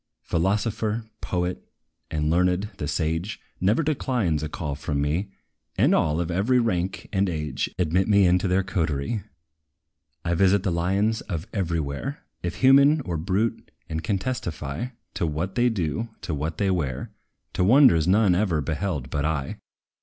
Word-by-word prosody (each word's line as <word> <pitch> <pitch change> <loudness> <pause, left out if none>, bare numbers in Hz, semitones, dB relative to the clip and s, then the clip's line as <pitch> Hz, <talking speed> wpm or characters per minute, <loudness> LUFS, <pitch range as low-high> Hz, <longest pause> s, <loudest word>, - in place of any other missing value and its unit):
Philosopher, 105 +5 0 0.2
poet, 90 0 -2 0.5
the 80 - -2
learned, 90 +6 +1
the 75 - -3
sage, 80 +6 -2 0.2
Never 105 - +2
declines 125 - 0
a 75 - -3
call 75 -2 -4
from 70 0 -3
me; 80 +8 0 0.5
And - - +4
all, 75 +1 +2
of 85 0 -2
every 105 +9 +2
rank 95 -6 -1
and 95 -1 +2
age, 75 -5 -2
Admit 90 +2 +1
me 100 -2 +5
into 90 +2 +3
their 95 +1 +2
coterie. 85 +1 -1 1.0
I 85 - +1
visit 95 +2 +3
the 95 - 0
lions 95 +6 +1
of 85 -4 -3
every 85 -5 0
where, 70 -3 -4 0.2
If 85 -1 -4
human, 140 +3 +6
or 90 -9 -4
brute, 95 +8 -1 0.2
and 80 0 -4
can 100 - 0
testify 90 - -3 0.3
To 85 - -1
what 80 +5 -2
they 125 0 +3
do, 110 +2 -2
to 85 - -4
what 75 +2 -3
they 100 -1 +1
wear, 70 -9 -2 0.4
To - - +1
wonders 110 - +6
none 100 0 +4
ever 90 -4 +1
beheld 75 -3 -2
but 70 -2 -1
I! 75 -3 -2
90 Hz, 160 wpm, -25 LUFS, 80-105 Hz, 1.0 s, human